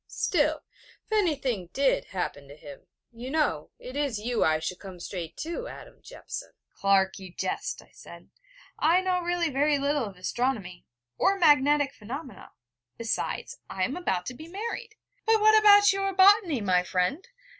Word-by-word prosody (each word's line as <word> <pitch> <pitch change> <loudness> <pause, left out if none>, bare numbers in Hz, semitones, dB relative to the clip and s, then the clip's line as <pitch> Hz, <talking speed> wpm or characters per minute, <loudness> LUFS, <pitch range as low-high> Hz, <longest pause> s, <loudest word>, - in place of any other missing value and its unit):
'Still, 305 -2 0 0.4
if - - -35
anything 275 - 0
did 275 -1 +2
happen 145 -6 -5
to 140 - -12
him, 145 -2 -13 0.2
you 240 +2 -8
know, 285 - 0
it 255 +1 -10
is 285 -6 -1
you 235 +2 0
I 155 0 +3
should 165 +3 -5
come 190 -3 -10
straight 175 -2 -6
to, 340 +10 -5
Adam - - -12
Jeffson.' - - -8 0.2
'Clark, 195 -1 +2
you 190 -2 -10
jest,' - - -4
I - - -25
said: - - -14 0.5
'I 335 +4 +4
know 365 -1 0
really 345 -2 0
very 290 +2 +2
little 280 -2 0
of 195 -3 -9
astronomy, 195 -3 -3 0.3
or 395 +1 +3
magnetic 290 -4 +4
phenomena. 260 +6 -8 0.5
Besides, 230 -1 -3
I 190 - -2
am 255 - -1
about 190 - -2
to 250 - -5
be 310 +6 -11
married....' 435 +4 -6 0.3
'But 445 0 +5
what 435 +1 +6
about 410 -1 +7
your 390 0 -1
botany, 380 - +5
my 185 -3 +3
friend? 180 - -1
275 Hz, 165 wpm, -27 LUFS, -, 0.5 s, about